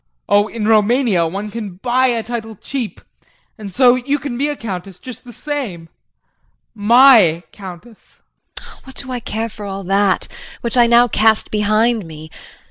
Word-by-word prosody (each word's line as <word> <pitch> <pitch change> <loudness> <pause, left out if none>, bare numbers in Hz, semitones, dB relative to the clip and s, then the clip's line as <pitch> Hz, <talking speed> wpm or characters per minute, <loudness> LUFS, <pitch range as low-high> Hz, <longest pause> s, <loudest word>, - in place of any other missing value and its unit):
JEAN. - - -54 0.2
Oh, 205 +1 +4
in 215 -2 -4
Roumania, 220 -4 +3
one 200 +5 -5
can 210 -5 -6
buy 250 +6 +1
a 235 -3 0
title 225 -1 -6
cheap 245 +2 -6 0.5
and 210 -3 -9
so 245 +4 +5
you 260 +3 -1
can 275 -3 -5
be 280 +4 0
a 295 - -2
countess 190 -6 -7
just 255 +2 -10
the 245 - -11
same 235 - -5 0.8
my 220 -6 +5
countess! 195 +3 -13 0.4
JULIE. - - -8
What 265 - -13
do 260 -2 -5
I 250 - -3
care 225 0 -3
for 210 -1 -11
all 195 0 -5
that 195 +1 +1 0.3
which 235 0 -1
I 240 -1 +5
now 240 +1 +5
cast 220 -1 +2
behind 215 0 +1
me. 155 0 -11
220 Hz, 170 wpm, -18 LUFS, 195-245 Hz, 0.8 s, so